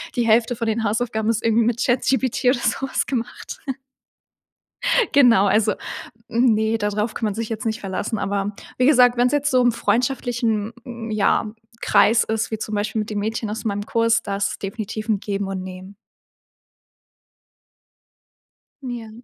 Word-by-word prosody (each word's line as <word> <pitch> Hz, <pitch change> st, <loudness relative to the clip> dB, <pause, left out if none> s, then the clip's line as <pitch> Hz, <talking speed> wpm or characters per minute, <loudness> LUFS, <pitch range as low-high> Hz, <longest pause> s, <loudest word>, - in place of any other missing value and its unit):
die 240 Hz, -, +1 dB
Hälfte 230 Hz, +2 st, +3 dB
von 230 Hz, 0 st, -3 dB
den 220 Hz, 0 st, 0 dB
Hausaufgaben 220 Hz, 0 st, -1 dB
ist 230 Hz, -1 st, 0 dB
irgendwie 230 Hz, 0 st, +3 dB
mit 235 Hz, +1 st, 0 dB
ChatGPT 260 Hz, 0 st, +1 dB
oder 250 Hz, 0 st, +4 dB
sowas 270 Hz, +2 st, -1 dB
gemacht. 245 Hz, -3 st, -5 dB, 1.5 s
Genau, 240 Hz, -8 st, +6 dB
also, 210 Hz, +1 st, +3 dB, 0.5 s
ne, 225 Hz, -2 st, +2 dB
darauf 210 Hz, +1 st, -1 dB
kann 225 Hz, -, -3 dB
man 210 Hz, -1 st, -1 dB
sich 230 Hz, 0 st, -4 dB
jetzt 225 Hz, 0 st, -4 dB
nicht 220 Hz, +1 st, -1 dB
verlassen, 200 Hz, +3 st, -3 dB
aber 200 Hz, +1 st, -2 dB, 0.2 s
wie 250 Hz, -, +3 dB
gesagt, 250 Hz, -4 st, +5 dB
wenn's 245 Hz, +2 st, +3 dB
jetzt 290 Hz, -1 st, +1 dB
so 255 Hz, -1 st, +4 dB
im 245 Hz, -1 st, +4 dB
freundschaftlichen, 235 Hz, -2 st, 0 dB, 0.4 s
ja, 210 Hz, 0 st, +1 dB, 0.3 s
Kreis 225 Hz, +1 st, +4 dB
ist, 220 Hz, +1 st, -2 dB
wie 220 Hz, -, -2 dB
zum 215 Hz, 0 st, -5 dB
Beispiel 210 Hz, +2 st, -1 dB
mit 215 Hz, -, -3 dB
den 210 Hz, -, -2 dB
Mädchen 220 Hz, +1 st, -2 dB
aus 215 Hz, +1 st, -5 dB
meinem 205 Hz, -1 st, -1 dB
Kurs, 230 Hz, 0 st, +2 dB
da 200 Hz, -1 st, -3 dB
ist 200 Hz, -, 0 dB
es -, -, -7 dB
definitiv 215 Hz, +2 st, -5 dB
'n 210 Hz, -, +2 dB
Geben 200 Hz, -1 st, -3 dB
und 195 Hz, -1 st, -4 dB
Nehmen. 185 Hz, +1 st, -9 dB, 2.9 s
Ja. 240 Hz, -3 st, -6 dB
220 Hz, 160 wpm, -22 LUFS, 210-240 Hz, 2.9 s, Genau